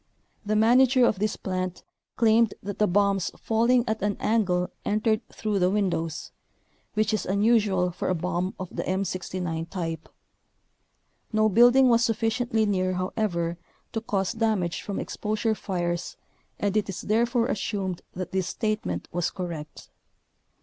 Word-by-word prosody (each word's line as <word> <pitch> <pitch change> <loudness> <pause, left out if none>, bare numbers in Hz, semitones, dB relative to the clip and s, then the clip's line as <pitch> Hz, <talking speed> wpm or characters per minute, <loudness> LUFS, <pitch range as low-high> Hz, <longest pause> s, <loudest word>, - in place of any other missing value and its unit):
The 215 0 0
manager 250 +3 +5
of 205 - +1
this 210 +1 0
plant 185 -1 -4 0.3
claimed 225 -1 +3
that 200 0 -5
the 210 - +4
bombs 200 0 +2
falling 235 +2 +2
at 220 0 -1
an 205 0 0
angle 180 -5 +1
entered 215 +1 +1
through 210 -2 -2
the 180 0 +3
windows, 175 -5 -1 0.6
which 215 0 +1
is 215 - 0
unusual 200 -2 +2
for 175 - -3
a 185 - +2
bomb 180 +2 -2
of 185 -2 -7
the - - -1
M69 180 -3 -3
type. 165 -3 -4 1.2
No 215 -1 +3
building 245 +5 +6
was 235 -1 +4
sufficiently 225 0 +1
near, 185 -2 +1
however, 180 -2 -2 0.3
to 225 - -2
cause 195 -2 -1
damage 215 -7 0
from 200 - -4
exposure 215 +1 -1
fires 175 -4 -3 0.4
and 205 0 0
it 210 -2 +1
is 190 - -4
therefore 235 +2 +1
assumed 195 -6 -2
that 180 -1 -5
this 190 -1 -1
statement 215 0 -2
was 175 0 0
correct. 165 -5 -7
205 Hz, 145 wpm, -26 LUFS, 180-220 Hz, 1.2 s, building